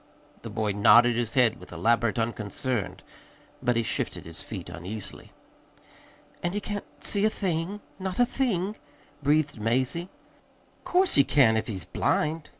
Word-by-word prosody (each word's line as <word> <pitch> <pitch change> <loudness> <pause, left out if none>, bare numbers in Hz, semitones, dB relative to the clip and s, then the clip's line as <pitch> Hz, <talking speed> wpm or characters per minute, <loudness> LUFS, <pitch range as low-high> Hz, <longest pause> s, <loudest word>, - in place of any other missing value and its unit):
The 115 - -7
boy 110 -1 -1
nodded 115 +4 +6
his 115 -1 -2
head 125 -4 +3
with - - -13
elaborate 115 0 +1
unconcern, 115 0 -2 0.6
but 120 - +1
he 115 - +2
shifted - - -3
his 80 0 -9
feet 95 -6 -7
uneasily. 95 +4 -7 1.1
"And 175 +2 -2
he - - +1
can't 205 0 -5 0.2
see 200 -1 +4
a 215 - +5
thing 190 0 -2 0.2
not 190 -1 -4
a 245 - +5
thing?" 215 -6 -1 0.4
breathed 145 -4 +1
Mazie. 130 - 0 0.8
"'Course 370 +1 +3
he 140 - +6
can't, 130 -6 +4
if 110 - -1
he's 95 -8 -5
blind!" 155 +1 -1
125 Hz, 150 wpm, -27 LUFS, 110-175 Hz, 1.1 s, nodded